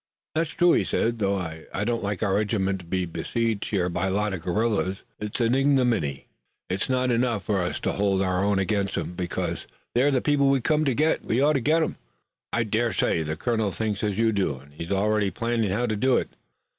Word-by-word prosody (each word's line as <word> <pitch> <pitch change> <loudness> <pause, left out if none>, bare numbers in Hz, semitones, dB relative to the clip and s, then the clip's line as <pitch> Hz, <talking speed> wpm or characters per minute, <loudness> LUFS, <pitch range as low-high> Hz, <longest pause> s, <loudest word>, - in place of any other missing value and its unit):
"That's 160 0 0
true," 175 +1 +4
he - - +3
said, 115 0 0
"though 100 -1 +1
I 85 +1 -4
don't 115 +1 -1
like 100 0 -2
our 100 -3 +1
regiment 100 -2 0
to 90 - -12
be 95 +1 -1
besieged 105 +6 -2
here 95 -4 +1
by 90 +2 -1
a - - 0
lot 105 +1 0
of 90 - -4
guerrillas. 95 +1 0 0.2
It's 105 +2 -4
an 115 0 +2
ignominy. 125 - +2 0.5
It's 95 +6 -2
not 130 -1 +1
enough 115 -4 +1
for 100 -3 0
us 90 - -2
to - - 0
hold 100 -1 +1
our 90 0 0
own 100 0 +2
against 100 0 0
'em, - - -3
because 90 -1 -3 0.3
they're 130 +4 +4
the 135 -3 +2
people 140 0 +2
we 135 0 +3
came 155 +4 +1
to 135 -4 +1
get, 155 +4 +2
and - - -16
we 115 - +2
ought 145 +3 +4
to 135 - +1
get 160 +6 +3
'em." - - -3 0.5
"I 120 - +1
dare 115 +2 0
say 80 - +1
the 80 0 -2
colonel 110 +3 0
thinks 105 +3 -2
as 105 -2 -1
you 115 0 +3
do 95 -9 0
and 70 +2 -17
he's 85 +3 -7
already 105 +1 +2
planning 115 -1 -1
how 110 +6 0
to 110 -2 -1
do 130 +4 +3
it. - - -2
105 Hz, 230 wpm, -25 LUFS, 95-120 Hz, 0.5 s, true